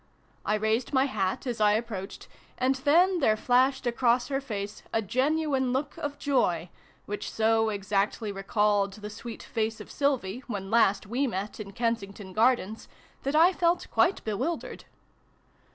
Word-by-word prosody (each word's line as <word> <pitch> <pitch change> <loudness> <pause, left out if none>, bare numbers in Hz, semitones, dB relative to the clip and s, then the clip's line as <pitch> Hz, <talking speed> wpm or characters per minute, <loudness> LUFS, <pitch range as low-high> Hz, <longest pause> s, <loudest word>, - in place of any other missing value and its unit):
I 210 - +1
raised 220 +5 0
my 265 0 +4
hat 200 -4 -2
as 240 -3 -3
I 210 0 +5
approached, 215 -3 -4 0.3
and 255 +1 +2
then 335 +7 +3
there 220 -7 +3
flashed 255 +3 +2
across 240 +1 +2
her 270 0 -1
face 210 -5 -5
a - - +1
genuine 265 +3 0
look 280 +2 -2
of 290 -1 -4
joy, 180 - +1 0.4
which 205 0 -4
so 225 0 +2
exactly 205 +1 -1
recalled 200 0 +1
the 210 +1 -8
sweet 230 +1 -8
face 220 -1 -2
of - - -10
Sylvie, 255 -7 0
when 195 -4 -5
last 205 -4 +3
we 250 +7 0
met 200 -1 -4
in 200 -2 -7
Kensington 200 -3 -3
Gardens, 220 -1 +1 0.3
that 275 +2 -2
I 340 +4 +6
felt 345 0 0
quite 360 +2 +2
bewildered. 330 - -3
225 Hz, 150 wpm, -28 LUFS, 205-270 Hz, 0.4 s, I